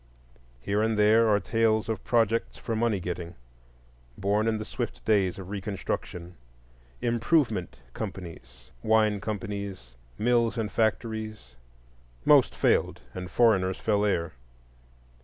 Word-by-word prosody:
Here 100 - 0
and 110 0 +1
there 110 +2 +5
are 105 -1 +4
tales 110 +1 +1
of 110 -1 -3
projects 115 -1 +1
for 115 - -3
money 110 -3 +1
getting, 85 -1 -5 0.8
born 105 +2 +1
in 110 -1 +1
the 110 - -5
swift - - -5
days 95 -4 +2
of 95 0 -8
Reconstruction,—"improvement" 90 - -3 0.2
companies, 80 - -8
wine 110 - +2
companies, 100 - -5 0.3
mills 120 +1 +2
and 110 -2 -2
factories; 110 - -2 0.7
most - - +5
failed, - - +1
and 90 -1 -6
the 115 -3 +4
Jew 95 0 -1
fell 105 -2 0
heir. 85 -6 0
105 Hz, 120 wpm, -27 LUFS, 90-110 Hz, 0.8 s, there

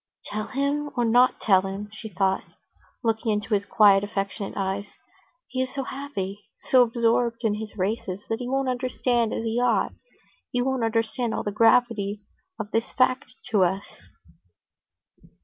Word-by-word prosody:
"Tell 215 +1 -4
him 285 +3 -1
or 240 - +2
not 245 +3 +4
tell 190 -3 +5
him?" 195 +2 -5
she 220 0 -8
thought, 190 0 +1 0.6
looking 225 0 +1
into 210 0 -2
his 200 -1 +1
quiet, 200 -2 +6
affectionate 200 0 -4
eyes. 195 +1 -2 0.5
"He 255 - -2
is 260 0 -2
so 275 -1 -3
happy, 255 -8 -5 0.2
so 255 - +4
absorbed 235 0 +1
in 220 -2 +2
his 215 0 -6
races 195 0 -2
that 225 - -2
he 245 -1 -4
won't 270 0 0
understand 245 -2 0
as - - -2
he 225 +1 0
ought, 245 -1 +2 0.6
he 245 - -1
won't 260 -1 0
understand 225 +1 0
all - - -2
the 205 - -2
gravity 215 -2 +3 0.4
of 215 -1 -5
this 225 0 0
fact 255 0 +1 0.2
to 205 -4 +4
us." 190 - -2
225 Hz, 160 wpm, -25 LUFS, 200-245 Hz, 0.6 s, quiet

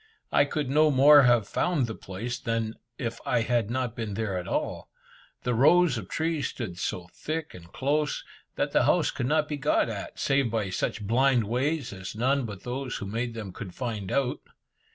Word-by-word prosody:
I - - +5
could 145 0 -2
no 150 +3 +4
more 145 +1 +8
have 120 -4 +3
found 165 -8 +1
the 115 - -5
place, 115 +6 -5
than 115 -1 -1 0.2
if 115 -2 -4
I - - +1
had 115 -2 +1
not 125 -2 -2
been 110 -4 -4
there 105 -3 -2
at 90 -1 -4
all. - - -2 0.5
The 125 - 0
rows 155 +5 +5
of 105 -6 -6
trees 160 -2 -1
stood 95 -8 -6
so 90 0 -3
thick 155 0 -4
and 85 -2 -13
close, 150 +2 0 0.3
that - - -1
the - - +3
house - - +3
could 120 - -2
not 150 +1 +2
be 150 - -3
got 145 -3 +2
at, 100 -3 -6
save 135 -3 +2
by 110 -4 -1
such 105 +3 -2
blind 125 +2 +3
ways 130 +4 -1
as 95 +1 -7
none 130 +4 +1
but 100 -3 -8
those 125 +1 -4
who - - -4
made 115 +3 -3
them 105 -5 -6
could 95 -4 -8
find 110 -7 -4
out. 135 -3 0
120 Hz, 195 wpm, -27 LUFS, 110-140 Hz, 0.5 s, more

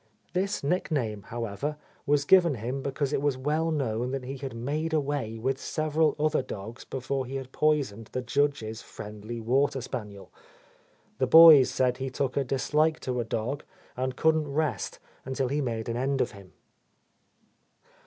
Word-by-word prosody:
This 190 0 -1
nickname, 140 - -1
however, 120 +6 -3 0.3
was 145 0 +3
given 175 -4 +5
him 125 +5 -4
because 140 +1 -2
it - - +1
was 145 -2 +1
well 150 +5 0
known 125 -6 -1
that 135 0 -3
he 135 +2 -5
had 135 -2 -6
"made 150 +7 -2
away" 140 -7 -1
with 130 +4 -2
several 155 0 +1
other 155 -1 +2
dogs 110 0 -8
before 135 0 -3
he 135 - -6
had 135 -1 -5
poisoned 135 -9 0
the 130 - -3
Judge's 125 -4 0
friendly 105 +3 -8
water 135 +4 +1
spaniel. 105 -7 -7 0.9
The 130 - +2
boys 160 -2 +9
said 125 -1 +1
he 135 0 -3
took 130 0 -2
a 140 - +2
dislike 150 +5 +1
to 125 -1 -2
a - - +1
dog 115 +6 -3 0.3
and 130 0 -2
couldn't 155 0 +2
rest 145 -8 -1 0.3
until 130 -1 -2
he 145 +2 0
made 115 -4 -3
an 115 0 -2
end 135 +2 0
of - - +1
him. 100 -2 -14
135 Hz, 165 wpm, -28 LUFS, 120-145 Hz, 0.9 s, boys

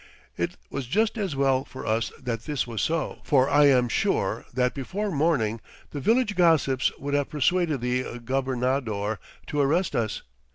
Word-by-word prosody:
It - - -3
was 140 -3 -4
just 220 - +1
as 195 -9 -2
well 135 -1 +2
for 130 - -9
us 110 +1 0
that 115 -3 -4
this 145 -3 -1
was 115 -3 -4
so, 165 -1 -1
for 135 -2 +3
I 145 +1 +5
am 125 -3 +4
sure - - 0
that 125 0 +1
before 195 +10 -3
morning 140 -9 +1 0.3
the 145 - -4
village 225 - +2
gossips 155 -7 +3
would 140 +1 -4
have 145 -1 +1
persuaded 155 -1 +1
the 125 0 -2
gobernador 125 -4 -1 0.3
to 145 - -1
arrest 165 +7 +1
us. 110 -3 -1
135 Hz, 165 wpm, -26 LUFS, 125-155 Hz, 0.3 s, I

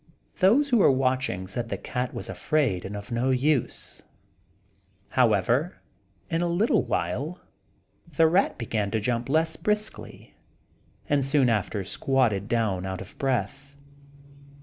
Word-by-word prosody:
Those 235 +10 +4
who 245 - +4
were - - +6
watching 130 -7 0
said 115 +5 -5
the - - -3
cat 125 0 -3
was - - -5
afraid 130 - 0
and 100 +2 -5
of 100 +3 -9
no 120 +3 0
use; 130 +1 -1 1.1
however, 125 - +2 0.5
in 165 +1 -1
a 175 - +1
little 175 - +2
while 125 - -2 0.7
the 160 +2 +3
rat 180 +5 +2
began 110 -3 -2
to 110 - -1
jump 120 +3 -2
less 160 +2 +1
briskly, 210 +5 -3 0.7
and 145 -1 +2
soon 135 -1 +3
after 105 -2 -1
squatted 110 -1 0
down 110 -6 0
out 95 -1 -4
of 95 - -11
breath. 135 +2 -2
130 Hz, 135 wpm, -26 LUFS, 110-155 Hz, 1.1 s, were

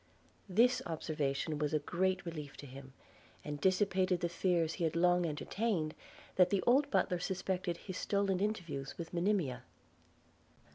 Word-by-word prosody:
This 235 +7 +4
observation 155 -2 -2
was 150 0 0
a - - +3
great 185 +1 0
relief 150 -4 -6
to - - -9
him, 135 0 -11 0.5
and 145 -1 -5
dissipated 185 -1 +2
the 175 - 0
fears 170 -2 +1
he 175 - -3
had 160 -1 0
long 175 0 +3
entertained, 160 +1 -1 0.4
that 180 -1 +6
the 195 -1 +1
old 275 +4 +4
butler 180 -9 +1
suspected 180 -1 -2
his 185 -2 -7
stolen 200 -2 +1
interviews 175 -10 -3
with 165 0 -7
Monimia. 175 -7 0
175 Hz, 145 wpm, -34 LUFS, 155-190 Hz, 0.5 s, that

